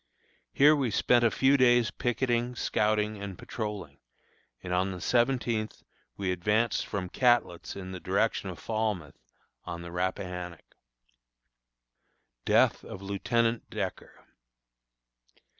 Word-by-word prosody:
Here 150 +2 +6
we 135 -5 0
spent 120 +3 +3
a 115 - +5
few 135 +4 +3
days 120 -4 +4
picketing, 120 +1 -1
scouting 105 -2 0
and 100 -3 -6
patrolling, 105 - -6 0.6
and 90 - -3
on 90 +2 +1
the 90 - -6
seventeenth 120 -1 0 0.3
we 95 -2 -1
advanced 105 +6 +1
from 95 -3 -3
Catlett's 120 -5 +1
in 95 -1 -7
the 95 - -6
direction - - 0
of - - -7
Falmouth, 110 -8 -3 0.4
on 85 0 -6
the 85 - -8
Rappahannock. 90 -1 -4 1.7
DEATH - - +3
OF 95 - -9
LIEUTENANT 115 +4 0
DECKER. - - -6
105 Hz, 115 wpm, -29 LUFS, 90-120 Hz, 1.7 s, Here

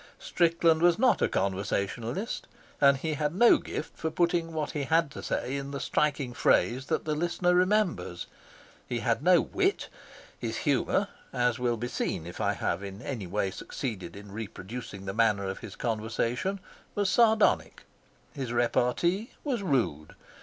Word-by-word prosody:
Strickland 165 -1 +2
was 175 0 +5
not 255 -1 +3
a - - +3
conversationalist, 100 - -2 0.3
and 140 -1 +6
he 155 +3 -2
had 150 +2 -1
no 235 +5 +6
gift - - -6
for 160 - -2
putting 170 0 +1
what 155 -2 -2
he 145 -2 -2
had 165 -1 +2
to - - -7
say 130 - -2
in 140 0 -4
the 140 0 -4
striking 140 -1 0
phrase 130 +2 +2
that - - -1
the 155 - 0
listener 175 +3 +1
remembers. 180 - +1 0.6
He 120 -2 -2
had 115 +1 +1
no 180 +2 +6
wit. 385 +1 0 0.5
His - - -3
humour, - - +1 0.2
as 125 -2 +1
will 120 -1 0
be 120 +2 -3
seen 85 - -2
if 85 - -7
I - - +2
have - - -2
in 100 0 -8
any 115 -9 -4
way 95 +1 -1
succeeded 100 -5 -5
in 100 0 -10
reproducing 105 -1 -7
the 95 - -3
manner 105 -3 +2
of 95 - -4
his 105 -3 -9
conversation, 115 - -1 0.4
was 205 -1 +1
sardonic. 220 +1 +3 0.5
His 130 -5 -4
repartee 125 - +1
was 260 -7 -1
rude. 120 - -1
135 Hz, 160 wpm, -28 LUFS, 110-170 Hz, 0.6 s, and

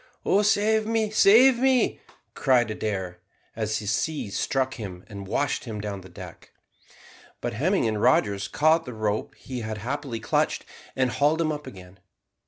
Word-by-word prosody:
"Oh, 200 - +3
save 215 +1 +2
me, 220 -2 0
save 235 +4 +6
me!" 260 -1 +2 0.3
cried 120 -5 +2
Adair, 95 -5 -4 0.4
as 110 -1 -1
a - - -8
sea 105 +3 -2
struck 130 +5 -1
him 95 -6 -8
and 100 -3 -9
washed 145 +6 -1
him 110 -3 -5
down 100 -2 -5
the 95 - -13
deck; 85 - -12 0.9
but 120 - -3
Hemming 155 - +1
and 110 -1 -1
Rogers 105 -5 +2
caught 160 +7 +2
the 125 -3 -7
rope 110 -1 -2
he 130 -2 -7
had 110 -1 -4
happily 130 +1 -4
clutched 110 - 0 0.3
and 130 -1 +1
hauled 150 +5 +2
him 160 -2 +1
up 150 -1 -6
again. 95 0 -12
120 Hz, 165 wpm, -25 LUFS, 105-160 Hz, 0.9 s, save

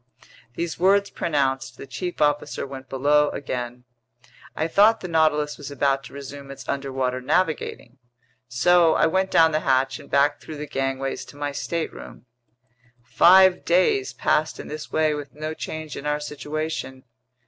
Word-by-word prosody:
These 170 -1 -4
words 200 +2 +3
pronounced, 135 -4 -1
the - - -9
chief 175 +8 -5
officer 145 0 0
went 135 -1 -9
below 145 +3 +3
again. 125 -2 -5 0.7
I 160 - -1
thought 210 +6 +4
the 180 - -5
Nautilus 155 -3 +1
was 145 - -7
about 140 -1 0
to - - -12
resume 140 0 -9
its 135 0 -10
underwater 130 -2 -2
navigating. 150 -4 -1 0.5
So 160 +7 +4
I - - +4
went 190 +4 +1
down 160 -1 +5
the 155 - +1
hatch 130 -2 +1
and 145 - -14
back 145 +1 +2
through 155 - -8
the 150 - -5
gangways 135 -1 -3
to 145 - -14
my 145 0 -3
stateroom. 165 -2 -5 0.8
Five 185 +7 +5
days 170 -7 +2
passed 150 +4 0
in - - -8
this 150 0 -7
way 155 -1 +2
with 145 -2 -7
no 155 +1 -4
change 155 -1 -6
in 145 - -6
our 150 0 0
situation. 150 -2 -5
145 Hz, 160 wpm, -23 LUFS, 135-160 Hz, 0.8 s, down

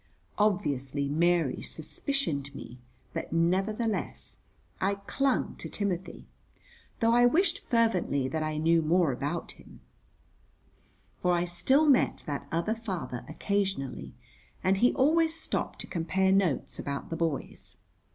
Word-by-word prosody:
Obviously 145 -9 +1
Mary 165 -1 +2
suspicioned 155 - -3
me, 125 -2 -9 0.3
but - - -4
nevertheless, 195 +7 0 0.4
I 195 +1 +1
clung 265 +7 -1
to - - -7
Timothy, 190 -3 -3 0.8
though 230 0 +4
I 245 0 +6
wished 355 +7 +2
fervently 190 - +1
that 160 +3 -2
I 155 0 -2
knew 165 +2 +3
more 165 0 +3
about 145 +7 -3
him; - - -16 1.4
for 180 0 +3
I 175 0 +2
still 265 - +3
met 280 -4 +3
that 145 -2 -4
other 170 +6 0
father 190 - -5
occasionally, 195 -4 -2 0.5
and 190 +1 +3
he 245 +5 +4
always 320 +4 +3
stopped - - -3
to - - -6
compare 190 +2 +1
notes 190 -7 +1
about 140 +2 -4
the - - -1
boys. 165 -4 -3
180 Hz, 125 wpm, -29 LUFS, 155-225 Hz, 1.4 s, I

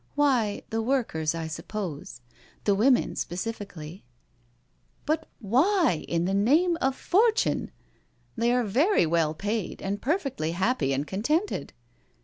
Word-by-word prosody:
'* - - -38
Why 255 -8 +2
the 225 0 0
workers, 220 - 0
I 165 -1 -3
suppose. 160 - -6 0.4
The 205 - +3
women 240 +6 +3
speci 185 +6 -3
ally/' 180 -5 -9 0.5
" 125 +1 -40
But 315 +1 -1
why 270 - +2
in 170 0 0
the 190 - 0
name 300 - +3
of 265 0 +1
fortune? 435 - +2 0.7
They 235 0 +1
are 250 0 +2
very 260 - +3
well 160 -1 +1
paid 205 +3 -3
and 200 +1 -3
perfectly 270 - -1
happy 190 - +1
and 135 +2 0
contented." 300 - -1
215 Hz, 135 wpm, -27 LUFS, 170-275 Hz, 0.7 s, The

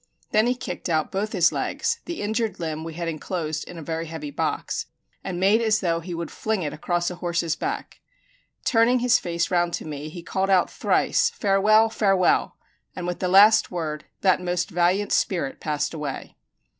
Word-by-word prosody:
Then 215 +2 +3
he 250 - +1
kicked 245 - -5
out 155 -2 0
both 205 +3 -2
his 180 -5 +3
legs - - -1
the 340 -9 -5
injured 220 +1 -1
limb 160 -2 -3
we 165 -1 -7
had 170 0 -3
inclosed 155 -1 -3
in 175 - -9
a 165 - -7
very 165 +1 -3
heavy 165 - -6
box - - -2 0.4
and 180 -2 -4
made 200 +5 +4
as 220 -2 +2
though 170 -4 0
he 170 +1 -6
would 170 -1 -5
fling 220 -4 -2
it 150 - -3
across 175 +2 -1
a 180 - -8
horse's 170 -2 -1
back. - - -4 0.7
Turning 235 +1 +4
his 245 0 +3
face 170 0 -2
round 175 -1 +1
to - - -3
me, 150 0 -6
he 170 +2 -9
called 190 +3 -1
out 185 -2 +3
thrice, 475 -1 +2
"Farewell, 215 - +3
farewell!" 195 -5 +2 0.4
and 180 - -5
with 180 0 -3
the 185 - 0
last 210 +4 +6
word 155 -4 -4 0.2
that 185 -1 +3
most 180 +2 -2
valiant 180 +4 +1
spirit 170 -8 0
passed 150 0 -2
away. 150 -4 -5
180 Hz, 190 wpm, -24 LUFS, 165-210 Hz, 0.7 s, last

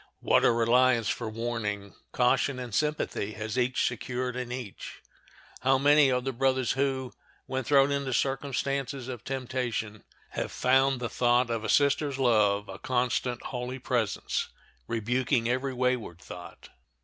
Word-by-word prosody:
What - - +3
a - - +6
reliance 120 0 +3
for 115 -2 -2
warning, 110 -3 -3 0.2
caution, 130 +2 +2
and 125 -3 -6
sympathy 150 -6 -1
has 110 +2 -5
each 125 0 +1
secured 125 +1 -3
in 125 -1 -4
each! 125 -6 -7 0.6
How 135 +1 +3
many 145 +1 +5
are 125 0 +1
the 135 +1 -3
brothers 130 0 +1
who, 135 -2 -1 0.3
when 130 0 -3
thrown 140 +2 +4
into 140 -1 -1
circumstances 135 +1 -1
of 125 -4 -6
temptation, 125 -5 -3 0.3
have - - -3
found 130 +1 +3
the 120 - -1
thought 120 0 +2
of 115 -1 -2
a - - -3
sister's 145 -1 +2
love 105 -5 +3
a 95 - -8
constant, 125 -1 -1
holy 125 +1 -4
presence, 120 -5 -1 0.4
rebuking 120 +2 0
every 130 +3 0
wayward 125 -8 -1
thought! 90 0 -11
125 Hz, 145 wpm, -28 LUFS, 115-135 Hz, 0.6 s, a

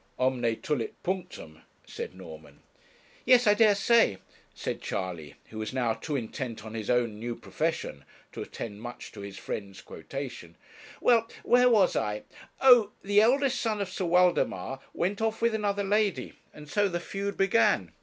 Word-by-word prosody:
'Omne 125 -3 +1
tulit 130 -7 -2
punctum,' 180 - -5 0.2
said - - -7
Norman. 80 -4 -12 0.6
'Yes, 250 -1 +5
I 210 - +6
dare 210 -1 +5
say,' 225 - +4 0.3
said - - -5
Charley, 85 -6 -4 0.2
who 110 - -7
was 110 +3 -4
now 120 -4 +1
too 150 +6 -5
intent 115 -3 -5
on 110 - -8
his 110 -2 -5
own 120 -4 +1
new 120 +1 -4
profession 155 - -3 0.3
to - - -7
attend 105 -2 -7
much 120 +1 -8
to 100 - -10
his 100 -1 -8
friend's 100 -1 -6
quotation. 120 - -8 0.4
'Well, 230 -2 +4 0.2
where 250 +1 +5
was 210 -6 +4
I? 105 0 -1 0.4
Oh! 245 -6 +6
the 205 +1 +4
eldest 265 +4 +3
son 220 -3 -1
of 195 -2 -3
Sir 185 0 -3
Waldemar 170 - +2 0.2
went 195 +5 -1
off 225 0 0
with 235 0 +2
another 205 -2 0
lady 200 -8 0 0.2
and 150 0 -12
so 205 +6 +2
the 175 -2 -2
feud 200 +3 -4
began. 115 - +3
150 Hz, 165 wpm, -28 LUFS, -, 0.6 s, I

